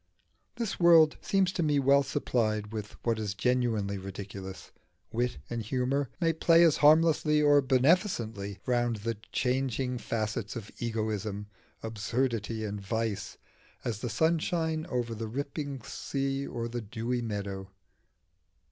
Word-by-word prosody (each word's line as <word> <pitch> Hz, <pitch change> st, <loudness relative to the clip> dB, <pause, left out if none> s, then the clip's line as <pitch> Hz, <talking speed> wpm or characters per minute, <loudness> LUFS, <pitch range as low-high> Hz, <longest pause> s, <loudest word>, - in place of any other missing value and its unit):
The 230 Hz, -4 st, -2 dB
world 165 Hz, -3 st, +6 dB
seems 190 Hz, -2 st, +2 dB
to -, -, -1 dB
me 150 Hz, -3 st, +2 dB
well 140 Hz, +1 st, +5 dB
supplied 110 Hz, -7 st, -1 dB
with 105 Hz, -1 st, -5 dB
what 115 Hz, -2 st, +1 dB
is 105 Hz, -3 st, -3 dB
genuinely 110 Hz, -4 st, 0 dB
ridiculous: 95 Hz, 0 st, -8 dB, 0.4 s
wit 120 Hz, -3 st, -1 dB
and 120 Hz, -1 st, -3 dB
humour 130 Hz, +4 st, 0 dB
may 165 Hz, -2 st, +2 dB
play 165 Hz, +1 st, +5 dB
as 165 Hz, -4 st, +5 dB
harmlessly 155 Hz, 0 st, +5 dB
or 145 Hz, -1 st, +5 dB
beneficently 130 Hz, -, +1 dB
round 120 Hz, -2 st, +1 dB
the 110 Hz, +1 st, -3 dB
changing 125 Hz, -1 st, 0 dB
facets 110 Hz, -1 st, -3 dB
of 110 Hz, -3 st, -7 dB
egoism, 110 Hz, -3 st, -2 dB, 0.4 s
absurdity, 115 Hz, 0 st, -1 dB
and 105 Hz, -1 st, -4 dB
vice, 110 Hz, 0 st, -3 dB, 0.5 s
as 110 Hz, -4 st, -2 dB
the 120 Hz, -, -3 dB
sunshine 160 Hz, +3 st, 0 dB
over 120 Hz, -2 st, -1 dB
the 110 Hz, 0 st, -4 dB
rippling 140 Hz, +1 st, -4 dB
sea 135 Hz, +5 st, -3 dB
or 115 Hz, -1 st, -3 dB
the 120 Hz, +1 st, -4 dB
dewy 115 Hz, +3 st, -3 dB
meadows. 100 Hz, -4 st, -4 dB
120 Hz, 130 wpm, -29 LUFS, 110-140 Hz, 0.5 s, world